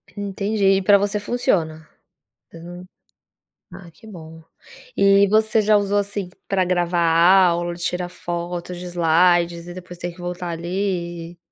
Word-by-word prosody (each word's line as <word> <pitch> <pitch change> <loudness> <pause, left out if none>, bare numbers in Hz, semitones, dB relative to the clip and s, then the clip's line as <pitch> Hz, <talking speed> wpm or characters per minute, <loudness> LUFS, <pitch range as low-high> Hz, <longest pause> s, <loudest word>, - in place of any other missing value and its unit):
Entendi. 200 0 0
E 195 - -1
para 200 +2 +5
você 205 +1 -1
funciona? 170 -9 -2 0.7
Hã, 175 +2 -10 0.9
Ah 175 -3 -12
que 220 +7 -18
bom. 160 -5 -12 0.5
E 200 0 +4
você 220 +2 +2
já 210 0 +3
usou 205 0 0
assim 200 -2 -3 0.2
para 195 -2 +1
gravar 175 -1 0 0.5
aula, 175 0 -2
tirar 175 +1 -3
fotos 175 0 -6
de 180 - -8
slides 175 0 +1
e 175 - -8
depois 180 -1 -10
ter 175 +1 -5
que 175 - -19
voltar 175 0 -5
ali? 170 -1 -4
180 Hz, 140 wpm, -21 LUFS, 170-200 Hz, 0.9 s, para